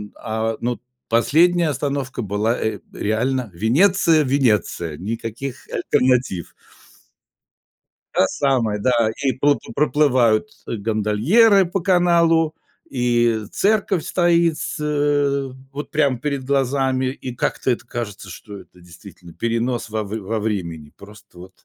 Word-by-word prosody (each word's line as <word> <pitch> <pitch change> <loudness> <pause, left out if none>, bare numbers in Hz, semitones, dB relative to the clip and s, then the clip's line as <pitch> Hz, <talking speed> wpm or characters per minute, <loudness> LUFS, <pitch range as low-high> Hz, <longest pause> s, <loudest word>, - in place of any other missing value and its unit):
а, 110 0 -3
ну, 120 +1 -2 0.3
последняя 165 +8 +3
остановка 140 -2 -3
была, 105 +3 -1
э, 110 - -2
реально 120 +3 -1
Венеция, 160 - +3
Венеция, 110 - 0
никаких 115 - -6
альтернатив. 125 -9 0 1.6
Та - - +4
самая, 120 -5 0
да, 115 0 +2
и 135 -2 +2
проплы 140 0 0
проплывают, 135 -5 +2 0.2
э, - - -3
гондольеры 115 - +3
по 185 +3 -2
каналу, 170 -3 +3 0.4
и 120 -3 +1
церковь 200 -4 +1
стоит, 170 -2 +2 0.2
э, 145 -2 0 0.2
вот 145 +2 -6
прям 140 -5 +1
перед 140 0 -3
глазами, 135 -1 0
и 130 -1 -5
как-то 125 - -1
это 120 -1 -2
кажется, 105 -5 -6
что 100 +4 -10
это 90 - -19
действительно 90 0 -14
перенос 115 +2 -2
во 110 0 -2
в 105 +2 -5
во 110 +3 -3
времени, 85 -8 -4
просто 105 -2 -16
вот. 90 +1 -15
125 Hz, 120 wpm, -21 LUFS, 110-145 Hz, 1.6 s, Та